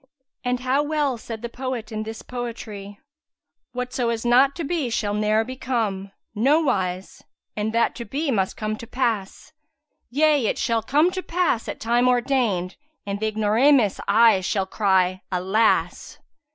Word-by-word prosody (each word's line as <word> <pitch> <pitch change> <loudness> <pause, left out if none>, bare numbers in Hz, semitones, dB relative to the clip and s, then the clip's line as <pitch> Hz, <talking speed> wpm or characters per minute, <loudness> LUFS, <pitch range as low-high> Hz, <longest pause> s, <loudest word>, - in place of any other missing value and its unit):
And 250 0 -1
how 260 +3 +2
well 295 -3 0
said 225 0 -8
the - - -2
poet 245 -2 -5
in 215 0 -3
this 220 +1 -7
poetry, 220 -5 -7 0.7
"Whatso 250 -1 -2
is 230 0 -3
not 260 +3 +4
to 340 - -4
be 310 -4 -1
shall 210 -3 -1
ne'er 215 +1 +2
become; 225 -6 -3
* - - -57 0.2
No 305 +2 +5
wise! 185 - -2 0.3
and 215 +1 -1
that 230 0 +2
to 235 - -6
be 285 +3 -2
must 190 -5 0
come 215 0 -3
to 230 - -10
pass; 230 -2 -2 0.6
Yea 290 -2 +3
it - - -1
shall 230 -2 0
come 300 +10 +2
to 370 - -3
pass 345 -10 0
at - - -5
time 240 +2 +2
ordained, 240 -8 +1
* 310 - -51
And 200 0 -3
th' 220 - -1
Ignoramus[FN#173] 220 +1 +3
aye 215 -1 +5
shall 190 +1 -1
cry 190 -2 +1
Alas!'" 190 +5 +1
230 Hz, 165 wpm, -23 LUFS, 210-260 Hz, 0.7 s, No